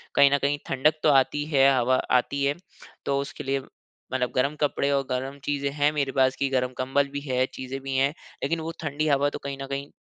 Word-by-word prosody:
कहीं 140 -1 +6
न 140 - +4
कहीं 140 +1 +1
ठंडक 150 +4 +2
तो - - +5
आती 145 +1 +3
है, 140 -3 +4
हवा 130 +1 +3 0.2
आती 140 +3 -3
है, 140 +1 +2 0.5
तो 140 0 +1
उसके 140 +1 -5
लिए 135 0 0 0.5
मतलब 125 -1 0
गरम 140 +4 +1
कपड़े 140 -1 +1
और 140 -1 +2
गरम 135 +2 -3
चीज़ें 140 -1 -1
हैं 145 +1 +2
मेरे 140 -3 0
पास 130 0 +2
कि 140 - 0
गरम 130 -1 0
कंबल 135 +2 +1
भी 145 +1 -4
है 130 -2 0
चीज़ें 130 +1 -5
भी 135 0 -4
हैं 140 +2 +2 0.3
लेकिन 165 - 0
वो 160 +1 -4
ठंडी 155 +2 -1
हवा 145 -1 +3
तो - - -4
कहीं 140 -1 -4
न - - -3
कहीं 140 +1 -4
140 Hz, 225 wpm, -26 LUFS, 135-145 Hz, 0.5 s, कहीं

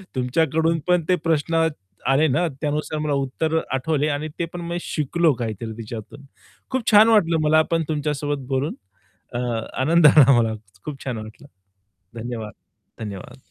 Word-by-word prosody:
तुमच्याकडून 160 +5 +1
पण 180 -2 +3
ते 180 - +5
प्रश्न 165 0 +1 0.4
आले 140 +4 +4
ना 170 +6 +1
त्यानुसार 150 0 -2
मला 150 -1 -1
उत्तर 140 +4 -1
आठवले 145 +3 0
आणि 145 +2 -2
ते 170 - +1
पण 175 - -5
मी 170 0 -2
शिकलो 160 +2 +1
काहीतरी 110 0 -4
तिच्यातून. 115 +4 -8 0.5
खूप 255 -3 0
छान 215 +2 +8
वाटलं 170 -7 +4
मला 155 +1 +5
पण 165 -1 +2
तुमच्यासोबत 145 -2 -2
बोलून 135 +3 -1 0.6
अ, 120 - -3 0.4
आनंद 160 +4 +5
आला 140 -2 +7
मला 110 -1 +1 0.3
खूप 145 -3 -7
छान 125 -4 -3
वाटलं. 110 +6 -10 0.7
धन्यवाद, 110 -3 -5 0.5
धन्यवाद. 110 +5 -9
150 Hz, 145 wpm, -22 LUFS, 130-165 Hz, 0.7 s, छान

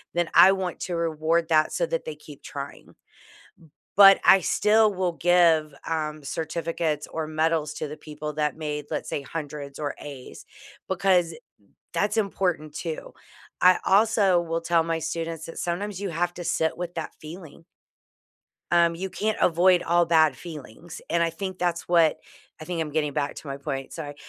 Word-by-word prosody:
then 175 -1 +1
I 190 +1 +8
want 185 -2 -4
to 175 - -3
reward 165 0 0
that 155 -1 +3
so - - 0
that - - -3
they 470 - -5
keep - - -14
trying. - - -9 1.0
But 195 -1 +9
I 190 - +7
still 215 +4 +3
will 185 -2 -1
give, 165 -4 +3
um, 155 -1 -3
certificates 160 0 -3
or 160 -1 -4
medals 155 -1 0
to 155 - -4
the 150 - -8
people 150 -1 -7
that 150 -1 -1
made, 150 -2 -4
let's - - -3
say, 145 - -3
100s 145 -1 -7
or 145 -2 -3
A's 140 -3 -10 0.4
because 180 -3 +2 0.6
that's 205 +5 0
important 180 -7 -1
too. 160 -1 -5 0.5
I 185 0 +6
also 200 -3 +4
will 165 0 -3
tell 165 0 +2
my 165 0 -2
students 165 0 -4
that 165 - -10
sometimes 190 +3 -3
you 200 - -2
have 175 +2 -1
to 175 - -6
sit 160 0 0
with 175 0 -5
that 165 - -5
feeling. 165 0 -11 1.1
Um, 170 -1 +4
you 190 +3 -4
can't 215 +3 -2
avoid 180 +1 +4
all 175 +1 +3
bad 160 -4 +3
feelings, 160 0 -10
and 170 0 +1
I 165 - +1
think 185 +2 -6
that's 175 -1 -2
what 165 -3 +4 0.4
I 155 - -7
think 175 -1 -3
I'm 150 - -5
getting 150 -1 -1
back 145 -1 -2
to - - -10
my 135 0 -4
point, 135 -2 -5
sorry. 145 -3 -6
165 Hz, 175 wpm, -25 LUFS, 155-180 Hz, 1.1 s, But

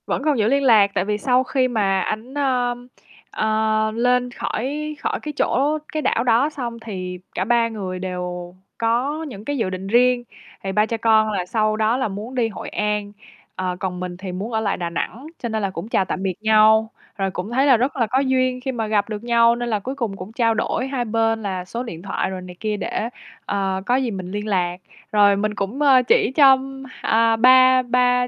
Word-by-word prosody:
Vẫn - - -1
còn 300 -3 +2
giữ 210 - +3
liên 280 +3 +2
lạc 215 -6 +5
tại 185 - 0
vì 210 0 -1
sau 250 +3 +2
khi 260 0 +1
mà 200 -5 +1
ảnh, 220 +7 -4
ờm, 250 -3 -1 0.4
ờ, 215 0 +1
lên 250 +1 +1
khỏi 295 +7 -3
khỏi - - -2
cái 300 - -5
chỗ 290 +4 +1
cái 310 - -2
đảo 230 - +1
đó 245 +4 +3
xong 240 -6 -6
thì 185 -5 -6 0.2
cả 185 - -1
3 235 +1 +3
người 190 -5 -5
đều 180 -1 -5 0.2
có 250 +7 0
những 215 -9 -8
cái 290 0 -2
dự 225 -6 0
định 185 +1 -5
riêng. 245 +3 +3 0.4
Thì 195 - -2
3 210 +2 +3
cha 230 +1 -3
con 220 -1 +3
là 190 -4 -2
sau 215 +2 0
đó 220 +3 +2
là 265 - 0
muốn 210 +5 -7
đi 240 -3 +2
Hội 220 - -7
An, 210 -1 -2 0.4
ờ, 185 -1 -2
còn 180 -2 -3
mình 180 -1 -5
thì 185 0 -6
muốn 195 +6 -5
ở 220 - +1
lại 205 -3 -1
Đà 175 -1 -3
Nẵng, 235 - -4
cho 235 - -4
nên 220 -1 -2
là 200 - 0
cũng 185 +1 -6
chào 195 - +2
tạm 185 - -4
biệt 190 -1 0
nhau. 220 0 +5 0.3
Rồi 195 -1 -1
cũng 185 +4 -5
thấy 265 +3 +2
là 265 -4 +6
rất 255 +4 -1
là 235 -4 +1
có 255 +5 +1
duyên 255 -1 +1
khi 265 +1 -2
mà 225 -3 -3
gặp 210 0 +1
được 210 0 -5
nhau 235 0 +4
nên 240 0 -3
là 215 -2 0
cuối 260 +7 -5
cùng 230 -7 -3
cũng 185 +3 -8
trao 230 -1 +2
đổi 225 +3 -1
hai 265 -3 -2
bên 225 0 0
là 185 -3 -3
số 230 +6 -5
điện 170 -9 -8
thoại 195 0 -2
rồi 190 -1 -5
này 180 -1 -10
kia 215 -1 -2
để, 220 +2 -3 0.4
ờ, 195 -1 -1
có 245 - +2
gì 260 -3 0
mình 185 -2 -6
liên 205 +1 -4
lạc. 180 -3 0 0.3
Rồi 205 -1 +5
mình 210 +1 -1
cũng, 200 +8 -3
ơ, 270 -3 +6
chỉ 455 - +3
cho, 270 -3 +7 0.4
à, 225 0 +3
ba 255 +2 +6
ba 250 0 +2
225 Hz, 225 wpm, -21 LUFS, 200-250 Hz, 0.4 s, cho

